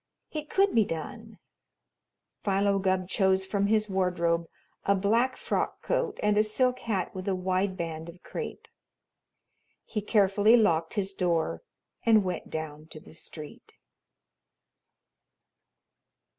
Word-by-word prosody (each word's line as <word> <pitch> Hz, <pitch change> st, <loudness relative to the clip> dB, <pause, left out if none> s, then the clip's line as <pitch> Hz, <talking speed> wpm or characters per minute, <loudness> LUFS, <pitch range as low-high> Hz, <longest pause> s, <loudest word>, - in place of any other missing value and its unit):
It 305 Hz, -1 st, -5 dB
could 390 Hz, 0 st, +3 dB
be 225 Hz, -, +5 dB
done! 160 Hz, -5 st, -6 dB, 1.1 s
Philo 200 Hz, 0 st, +2 dB
Gubb 185 Hz, -1 st, +1 dB
chose 190 Hz, 0 st, +2 dB
from 200 Hz, +1 st, 0 dB
his 215 Hz, 0 st, +2 dB
wardrobe 170 Hz, -3 st, 0 dB, 0.3 s
a 200 Hz, -, +3 dB
black 230 Hz, +7 st, +2 dB
frock -, -, -2 dB
coat -, -, -1 dB
and 210 Hz, 0 st, +3 dB
a -, -, +7 dB
silk 250 Hz, +4 st, +1 dB
hat 200 Hz, -7 st, -2 dB
with 185 Hz, 0 st, -6 dB
a 195 Hz, -, +1 dB
wide 185 Hz, +1 st, 0 dB
band 165 Hz, -1 st, -4 dB
of 175 Hz, +1 st, -13 dB
crape. -, -, -6 dB, 1.2 s
He 210 Hz, -, -3 dB
carefully 205 Hz, +2 st, +4 dB
locked 165 Hz, -6 st, +2 dB
his 195 Hz, -2 st, -1 dB
door 175 Hz, -4 st, 0 dB, 0.4 s
and 220 Hz, -3 st, +5 dB
went 180 Hz, -2 st, -4 dB
down 155 Hz, -1 st, -5 dB
to 155 Hz, -, -10 dB
the -, -, -15 dB
street. 155 Hz, -2 st, -9 dB
195 Hz, 130 wpm, -28 LUFS, 175-215 Hz, 1.2 s, a